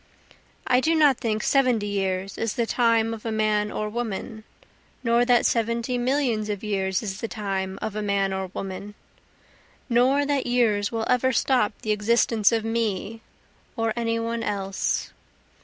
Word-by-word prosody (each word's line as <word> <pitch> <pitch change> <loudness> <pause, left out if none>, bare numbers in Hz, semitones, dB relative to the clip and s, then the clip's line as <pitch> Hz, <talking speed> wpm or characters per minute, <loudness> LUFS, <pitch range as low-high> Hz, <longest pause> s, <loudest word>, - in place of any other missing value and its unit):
I 250 -1 +4
do 320 +5 +2
not 295 -5 +4
think 215 -2 -1
seventy 250 -6 +2
years 195 -1 -2
is 225 -2 -2
the 235 -3 +1
time 230 -1 +2
of 220 - -8
a 225 - -3
man 215 -1 +1
or 215 - -3
woman, 220 0 -4 0.6
Nor 235 0 +3
that 245 -1 +4
seventy 235 +2 0
millions 245 -4 0
of 205 -1 -3
years 190 -1 -1
is 195 -2 -4
the 230 - -2
time 195 -3 -3
of 215 - -3
a 215 - -2
man 200 -1 0
or 190 0 -3
woman, 195 +2 -7 0.9
Nor 260 +4 +3
that 280 -3 0
years 220 -5 +2
will 225 -1 -2
ever 255 +1 +2
stop 250 -4 +2
the 215 - 0
existence 215 0 +2
of 225 -1 0
me, 225 -1 -2 0.6
or 225 -1 0
any 230 -1 -1
one 230 0 -2
else. 195 -3 -2
225 Hz, 160 wpm, -25 LUFS, 205-240 Hz, 0.9 s, I